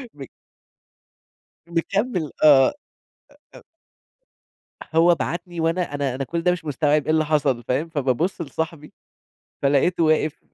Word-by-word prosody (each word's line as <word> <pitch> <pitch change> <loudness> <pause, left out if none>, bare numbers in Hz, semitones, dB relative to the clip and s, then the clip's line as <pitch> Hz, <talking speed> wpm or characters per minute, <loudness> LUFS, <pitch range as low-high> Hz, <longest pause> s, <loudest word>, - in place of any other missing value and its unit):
م 140 - -9 1.4
مكمّل 175 - -2
آه، 140 -4 +6 0.8
أ - - -10
أ - - -16 1.3
هو 170 +1 +5
بعتني 175 +1 -5
وأنا 165 0 -1
أنا 140 -3 -2
أنا 135 - -3
كل 165 +5 -3
ده 180 +1 +2
مش 180 -2 -4
مستوعب 150 0 +1
إيه 155 - -1
اللي 155 0 +2
حصل 145 -5 0
فاهم، 135 +8 -2
فبابُصّ 150 +4 -1
لصاحبي 155 0 -5 0.7
فلقيتُه 145 +5 +2
واقف 155 -1 +1
155 Hz, 125 wpm, -22 LUFS, 145-170 Hz, 1.4 s, آه